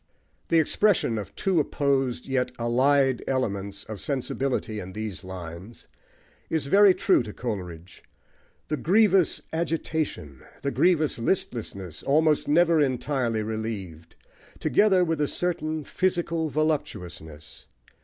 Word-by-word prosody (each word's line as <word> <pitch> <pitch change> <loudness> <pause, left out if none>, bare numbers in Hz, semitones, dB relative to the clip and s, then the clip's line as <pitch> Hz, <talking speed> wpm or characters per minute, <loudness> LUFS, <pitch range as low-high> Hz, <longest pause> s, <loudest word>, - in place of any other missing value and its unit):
The 165 - +3
expression 160 - +2
of 100 - -8
two 190 -4 +1
opposed, 135 -4 0
yet 130 -2 0
allied, 130 +2 +2
elements 100 -6 -2
of 110 -3 -8
sensibility 130 -4 -2
in 95 -1 -8
these 105 -3 -5
lines, 95 +3 -9 0.6
is 160 -4 -1
very 195 +5 +6
true 190 - +3
to 110 - -6
Coleridge: 90 -7 -6 0.7
the 155 - -1
grievous 195 0 +3
agitation, 160 - -2 0.2
the 140 - 0
grievous 155 -7 +2
listlessness, 115 - -3
almost 155 +1 +2
never 165 +1 +4
entirely 125 -4 0
relieved, 105 -7 -5 0.4
together 195 -3 +3
with 165 -2 -1
a 145 - +2
certain 155 -3 -2
physical 170 -2 -1
voluptuousness. 90 - -4
135 Hz, 115 wpm, -26 LUFS, 105-160 Hz, 0.7 s, very